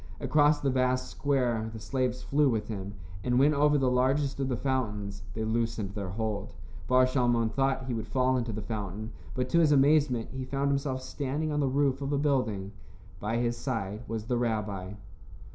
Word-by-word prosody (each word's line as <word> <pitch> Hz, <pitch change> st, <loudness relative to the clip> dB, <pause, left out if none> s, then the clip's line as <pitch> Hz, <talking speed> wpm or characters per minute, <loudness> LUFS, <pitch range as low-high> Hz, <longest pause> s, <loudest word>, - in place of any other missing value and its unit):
Across 150 Hz, 0 st, +3 dB
the 140 Hz, -, +1 dB
vast 130 Hz, 0 st, +1 dB
square 125 Hz, -6 st, 0 dB
the 110 Hz, -, -8 dB
slaves 125 Hz, +1 st, -1 dB
flew 145 Hz, 0 st, +3 dB
with 110 Hz, -3 st, -1 dB
him, 100 Hz, -1 st, -5 dB, 0.3 s
and 125 Hz, -1 st, +1 dB
when 145 Hz, +3 st, +5 dB
over 145 Hz, +1 st, +4 dB
the 130 Hz, -2 st, +2 dB
largest 135 Hz, +3 st, +1 dB
of 135 Hz, -1 st, 0 dB
the 125 Hz, -, 0 dB
fountains 105 Hz, -7 st, -2 dB
they 110 Hz, -, -2 dB
loosened 110 Hz, -3 st, -1 dB
their 100 Hz, -3 st, -4 dB
hold. 105 Hz, +1 st, -3 dB, 0.3 s
Bar 130 Hz, 0 st, +5 dB
Shalmon 120 Hz, -3 st, +2 dB
thought 135 Hz, 0 st, 0 dB
he 125 Hz, -, -2 dB
would 115 Hz, -1 st, -3 dB
fall 130 Hz, +3 st, +2 dB
into 120 Hz, -2 st, -1 dB
the 105 Hz, 0 st, -5 dB
fountain, 105 Hz, 0 st, -4 dB, 0.2 s
but 125 Hz, 0 st, 0 dB
to 170 Hz, -, +4 dB
his 160 Hz, -3 st, +4 dB
amazement 140 Hz, -4 st, +3 dB
he 130 Hz, -1 st, -4 dB
found 140 Hz, +2 st, -1 dB
himself 135 Hz, -2 st, -1 dB
standing 145 Hz, +3 st, -2 dB
on 150 Hz, -, 0 dB
the 140 Hz, -, +2 dB
roof 135 Hz, 0 st, +1 dB
of 140 Hz, 0 st, -2 dB
a 145 Hz, -, +2 dB
building. 125 Hz, -9 st, 0 dB, 0.5 s
By 110 Hz, +4 st, -1 dB
his 120 Hz, 0 st, 0 dB
side 110 Hz, -6 st, -3 dB
was 110 Hz, -1 st, -4 dB
the 120 Hz, +1 st, 0 dB
rabbi. 105 Hz, -5 st, -2 dB
125 Hz, 195 wpm, -29 LUFS, 110-135 Hz, 0.5 s, when